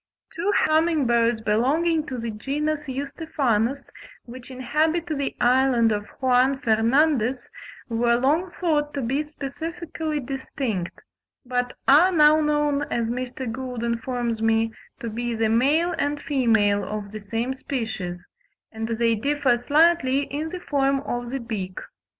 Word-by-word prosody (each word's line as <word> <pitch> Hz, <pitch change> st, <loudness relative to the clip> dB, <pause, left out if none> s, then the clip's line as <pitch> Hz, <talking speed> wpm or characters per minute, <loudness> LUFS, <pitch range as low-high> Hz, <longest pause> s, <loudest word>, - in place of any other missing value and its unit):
Two 365 Hz, +4 st, 0 dB
humming 315 Hz, -1 st, +2 dB
birds 235 Hz, -1 st, +2 dB
belonging 300 Hz, +10 st, +1 dB
to 255 Hz, -, -4 dB
the 230 Hz, -1 st, -4 dB
genus 295 Hz, +7 st, -2 dB
Eustephanus, 275 Hz, -3 st, -1 dB, 0.4 s
which 250 Hz, +1 st, -11 dB
inhabit 305 Hz, +6 st, 0 dB
the 285 Hz, -5 st, -3 dB
island 245 Hz, -2 st, +3 dB
of 205 Hz, -1 st, -2 dB
Juan 260 Hz, +1 st, +3 dB
Fernandez, 250 Hz, +1 st, +2 dB, 0.4 s
were 235 Hz, 0 st, +2 dB
long 295 Hz, +9 st, +1 dB
thought 295 Hz, -4 st, 0 dB
to 280 Hz, -, -1 dB
be 265 Hz, +5 st, 0 dB
specifically 310 Hz, +1 st, -5 dB
distinct, 255 Hz, -7 st, -4 dB, 0.4 s
but 245 Hz, 0 st, -1 dB
are 315 Hz, +7 st, +6 dB
now 305 Hz, -2 st, +5 dB
known, 295 Hz, -1 st, +1 dB
as 230 Hz, -1 st, 0 dB
Mr. 255 Hz, +1 st, -4 dB
Gould 250 Hz, -1 st, -5 dB
informs 235 Hz, -1 st, -2 dB
me, 225 Hz, 0 st, +2 dB, 0.3 s
to 235 Hz, -, -5 dB
be 235 Hz, +1 st, -3 dB
the 225 Hz, 0 st, +1 dB
male 295 Hz, +10 st, +2 dB
and 290 Hz, +1 st, 0 dB
female 225 Hz, -8 st, +2 dB
of 205 Hz, 0 st, -5 dB
the 215 Hz, -, -6 dB
same 225 Hz, +5 st, -3 dB
species, 210 Hz, -10 st, -4 dB, 0.5 s
and 225 Hz, 0 st, -4 dB
they 230 Hz, 0 st, +1 dB
differ 275 Hz, +2 st, +1 dB
slightly 285 Hz, 0 st, +3 dB
in 300 Hz, +3 st, -4 dB
the 360 Hz, +1 st, -6 dB
form 275 Hz, -3 st, +1 dB
of 240 Hz, -3 st, -4 dB
the 270 Hz, +2 st, -3 dB
beak. 205 Hz, -6 st, -5 dB
260 Hz, 140 wpm, -24 LUFS, 230-295 Hz, 0.5 s, are